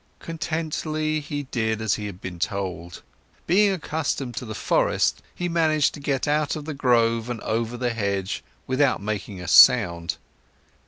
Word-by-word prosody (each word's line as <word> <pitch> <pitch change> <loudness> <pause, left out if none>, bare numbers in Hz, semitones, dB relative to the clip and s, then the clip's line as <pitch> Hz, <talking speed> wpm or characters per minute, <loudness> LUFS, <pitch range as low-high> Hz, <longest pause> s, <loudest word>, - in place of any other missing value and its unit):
Contently, 155 -1 -2
he 145 -1 -4
did 110 -2 0
as 110 -1 +1
he 105 -1 -3
had 95 -3 -9
been 90 -2 -7
told. 90 -2 -4 0.4
Being 200 +3 +4
accustomed 150 - -3
to - - -3
the 110 -2 -6
forest, - - +1
he 175 - -2
managed 160 -3 +2
to - - -9
get 140 -2 -1
out 150 0 +1
of 150 -2 -6
the 155 - -4
grove 115 -4 +2
and 120 -2 -3
over 115 +2 -2
the 120 -1 -1
hedge 100 -3 -2 0.2
without 130 +1 +2
making 100 -2 -4
a 90 - -7
sound. 85 -11 +6
125 Hz, 160 wpm, -24 LUFS, 105-155 Hz, 0.4 s, sound